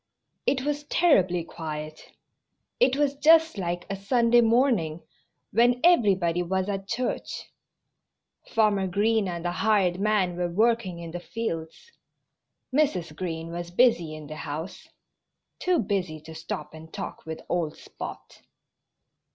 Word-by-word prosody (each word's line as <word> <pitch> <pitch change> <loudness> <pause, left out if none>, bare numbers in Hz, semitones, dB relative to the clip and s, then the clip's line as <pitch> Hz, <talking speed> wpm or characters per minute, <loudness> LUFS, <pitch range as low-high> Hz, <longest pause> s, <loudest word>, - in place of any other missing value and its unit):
It 265 -2 +2
was 295 0 -2
terribly 185 - +3
quiet. 155 -2 -7 0.7
It 260 0 +4
was 285 -1 +2
just 320 -1 +4
like 175 -1 -3
a 195 - -3
Sunday 235 +4 +3
morning, 225 - +2 0.5
when 240 +3 +4
everybody 190 - +4
was 190 +2 -1
at 195 -1 -3
church. 250 +4 -3 1.0
Farmer 210 -4 +2
Green 210 +2 +1
and 170 -1 -5
the 175 - 0
hired 185 -2 +2
man 200 -4 +1
were 175 -1 -1
working 215 -1 +1
in 170 -1 -7
the 175 - -5
fields. 175 - -5 0.8
Mrs. 185 - +1
Green 165 -2 -4
was 175 0 -5
busy 175 -6 +3
in 155 -1 -9
the 155 +1 -8
house 155 +5 -6 0.7
too 365 -1 +2
busy 185 - -1
to 160 +1 -11
stop 160 0 -6
and 160 0 -12
talk - - -6
with 160 0 -5
old 170 -4 -1
Spot. - - -9
190 Hz, 135 wpm, -26 LUFS, 170-235 Hz, 1.0 s, It